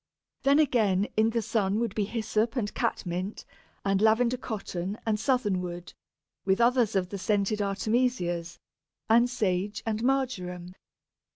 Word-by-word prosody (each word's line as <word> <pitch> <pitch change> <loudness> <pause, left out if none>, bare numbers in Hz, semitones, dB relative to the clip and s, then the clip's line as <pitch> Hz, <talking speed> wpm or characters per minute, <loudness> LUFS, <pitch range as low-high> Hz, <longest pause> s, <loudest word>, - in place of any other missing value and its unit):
Then 275 +1 +4
again 215 -9 +3
in 220 +1 +4
the 230 0 -1
sun 210 -2 0
would 230 -4 -1
be 210 -2 0
Hyssop 220 +1 -1
and 215 -5 -2
Catmint, 185 +3 -3 0.4
and 195 0 +2
Lavender 230 +3 +4
cotton 200 -5 -4
and 215 -2 +1
Southernwood, 185 -9 -1 0.5
with 190 +1 +2
others 235 -3 +3
of 185 -2 +1
the 200 - -5
scented 205 +1 0
Artemisias, 200 -4 0 0.5
and 235 +2 +5
Sage 205 -2 -1
and 220 -1 -1
Marjoram. 185 -10 -1
215 Hz, 130 wpm, -28 LUFS, 190-235 Hz, 0.5 s, and